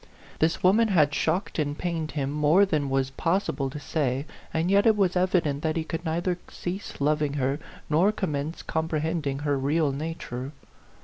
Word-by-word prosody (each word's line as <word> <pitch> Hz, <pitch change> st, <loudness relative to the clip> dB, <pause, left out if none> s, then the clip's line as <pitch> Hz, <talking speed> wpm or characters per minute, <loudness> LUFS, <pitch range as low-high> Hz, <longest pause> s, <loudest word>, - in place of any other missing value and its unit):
This 160 Hz, +1 st, +1 dB
woman 210 Hz, +5 st, +5 dB
had 155 Hz, -8 st, +3 dB
shocked 160 Hz, +4 st, 0 dB
and 145 Hz, -1 st, -1 dB
pained 165 Hz, -3 st, -2 dB
him 140 Hz, -2 st, -1 dB
more 150 Hz, +6 st, +4 dB
than 150 Hz, -7 st, 0 dB
was 135 Hz, 0 st, 0 dB
possible 165 Hz, -3 st, 0 dB
to 150 Hz, -, -7 dB
say, 140 Hz, -3 st, -1 dB, 0.3 s
and 165 Hz, +3 st, 0 dB
yet 200 Hz, +2 st, +5 dB
it 220 Hz, -1 st, +5 dB
was 185 Hz, -3 st, +2 dB
evident 180 Hz, -6 st, +1 dB
that 160 Hz, 0 st, 0 dB
he 160 Hz, -, 0 dB
could 165 Hz, +1 st, -4 dB
neither 175 Hz, +2 st, -1 dB
cease 185 Hz, +3 st, -6 dB
loving 150 Hz, 0 st, +1 dB
her, 135 Hz, 0 st, 0 dB, 0.3 s
nor 170 Hz, +7 st, +4 dB
com 190 Hz, -6 st, -2 dB
mence 145 Hz, +3 st, -3 dB
comprehending 160 Hz, -2 st, -1 dB
her 145 Hz, -2 st, +1 dB
real 145 Hz, +2 st, +1 dB
nature. 140 Hz, -3 st, -5 dB
155 Hz, 175 wpm, -26 LUFS, 145-175 Hz, 0.3 s, woman